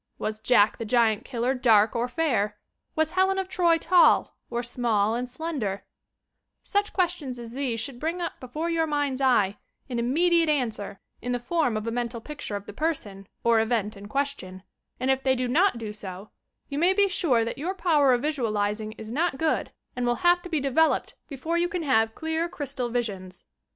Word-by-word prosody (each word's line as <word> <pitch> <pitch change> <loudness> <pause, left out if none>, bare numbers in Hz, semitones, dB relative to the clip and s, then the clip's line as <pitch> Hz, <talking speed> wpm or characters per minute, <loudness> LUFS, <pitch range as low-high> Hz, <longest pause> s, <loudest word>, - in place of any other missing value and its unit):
"Was 215 0 -3
Jack, 220 -2 +3
the - - -2
Giant 225 -2 +2
killer, 250 0 -1
dark 225 -4 +4
or 235 +1 0
fairl" 245 -7 0 0.4
"Was 315 -1 +1
Helen 380 +1 +2
of 385 -1 -1
Troy 345 -3 +3
tall, 345 +1 +4
or 240 +1 -2
small 230 -3 +1
and 245 +2 -2
slenderT' 250 -9 -4 0.8
Such 405 0 0
questions 340 -9 -1
as 235 -1 -8
these 250 -3 -2
should 245 +1 -4
bring 330 +5 -2
up 345 - -4
before 300 +6 -4
your 330 -1 +1
mind's 290 -3 -1
eye 210 -7 +3 0.3
an 240 -2 -2
immediate 330 +7 +3
answer 225 -9 -1 0.2
in 245 - -2
the 245 - -1
form 250 -2 0
of 215 - -4
a 230 - -2
mental 240 0 -3
pic 295 +5 -9
ture 205 - -3
of 200 - -10
the - - -9
person 205 - -3 0.2
or 230 -1 +4
event 220 -2 0
in 200 +1 -10
question, 215 -8 -3 0.4
and 260 +1 +2
if 265 0 +1
they 265 -1 +2
do 250 0 -1
not 330 +4 +3
do 220 -2 -5
so, 195 -1 -8 0.4
you 285 0 -3
may 355 +4 +4
be 400 +1 +4
sure 280 -12 +1
that 230 - -5
your 360 +6 -2
power 305 -8 +3
of 245 +1 +2
visualizing 215 -7 -1
is 220 0 -9
not 320 +2 0
good 320 +1 0 0.2
and 245 -1 -1
will 240 - +2
have 350 0 +5
to 355 - -9
be 320 -3 0
developed 280 +4 +2
before 320 +5 -2
you 350 +1 +1
can 355 -2 -3
have 225 -6 +2
clear 320 +1 -2
crystal 275 -6 -4
visions. 195 -6 -4
255 Hz, 195 wpm, -26 LUFS, 225-320 Hz, 0.8 s, have